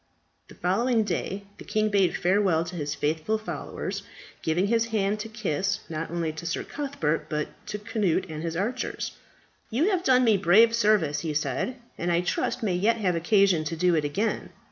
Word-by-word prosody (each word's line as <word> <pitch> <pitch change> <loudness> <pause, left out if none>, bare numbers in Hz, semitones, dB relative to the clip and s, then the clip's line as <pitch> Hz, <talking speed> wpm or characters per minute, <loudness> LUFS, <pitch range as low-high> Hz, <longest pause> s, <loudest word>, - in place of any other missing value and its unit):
The - - -14
following 225 +6 +2
day 195 +1 -3 0.2
the - - -8
king 215 0 0
bade 195 -3 +2
farewell 185 -3 +2
to 175 +2 -7
his 150 -3 -3
faithful 160 +9 0
followers, 215 - -5 0.4
giving 165 +4 +1
his 225 +2 +2
hand 210 -2 0
to 225 +1 -5
kiss, 195 -2 -1
not 165 0 -4
only 165 -1 -1
to 160 +2 -8
Sir 165 - -2
Cuthbert, 270 - -2
but 150 -1 -2 0.2
to 210 - -3
Cnut 210 -5 0
and 155 -2 -6
his 165 0 -3
archers. 215 +9 -2 0.6
"You 305 - +2
have 365 -2 0
done 255 -3 +5
me 220 -4 +5
brave 200 +6 +5
service," 210 -10 +3
he 155 -2 -3
said, 145 - -1 0.2
"and 175 +1 0
I 170 0 +3
trust 180 - -1
may 200 -4 +1
yet 210 +6 +2
have 185 -5 +1
occasion 180 -1 +3
to 165 - -2
do 180 +2 +3
it 155 -2 +2
again. 200 +10 -1
190 Hz, 190 wpm, -26 LUFS, 165-220 Hz, 0.6 s, done